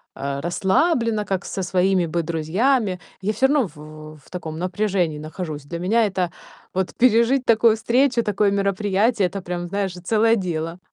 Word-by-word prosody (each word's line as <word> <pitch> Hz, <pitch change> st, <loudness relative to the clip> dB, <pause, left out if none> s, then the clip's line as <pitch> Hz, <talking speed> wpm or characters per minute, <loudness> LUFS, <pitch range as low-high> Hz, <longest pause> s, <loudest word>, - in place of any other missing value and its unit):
э, 140 Hz, 0 st, -4 dB
расслабленно, 215 Hz, -, +1 dB
как 190 Hz, -1 st, -2 dB
со 190 Hz, -, -4 dB
своими 185 Hz, 0 st, +2 dB
бы 170 Hz, +1 st, -1 dB
друзьями. 185 Hz, -, 0 dB, 0.2 s
Я 200 Hz, +2 st, 0 dB
всё 265 Hz, +5 st, +3 dB
равно 280 Hz, -5 st, +2 dB
в -, -, -16 dB, 0.4 s
в 155 Hz, -, -14 dB
в -, -, -20 dB
таком 160 Hz, -3 st, -6 dB
напряжении 180 Hz, -4 st, -1 dB
нахожусь. 155 Hz, -1 st, -6 dB
Для 170 Hz, +4 st, -6 dB
меня 220 Hz, +5 st, +2 dB
это, 185 Hz, -3 st, -1 dB, 0.4 s
вот 190 Hz, 0 st, -1 dB
пережить 245 Hz, +2 st, +3 dB
такую 225 Hz, -1 st, +4 dB
встречу, 240 Hz, +2 st, +2 dB
такое 205 Hz, -1 st, +1 dB
мероприятие- 200 Hz, +2 st, +1 dB
это 195 Hz, +2 st, -6 dB
прям, 175 Hz, -1 st, -4 dB
знаешь, 195 Hz, 0 st, -2 dB
целое 220 Hz, +6 st, +2 dB
дело. 170 Hz, -3 st, -3 dB
195 Hz, 165 wpm, -22 LUFS, 175-225 Hz, 0.4 s, такую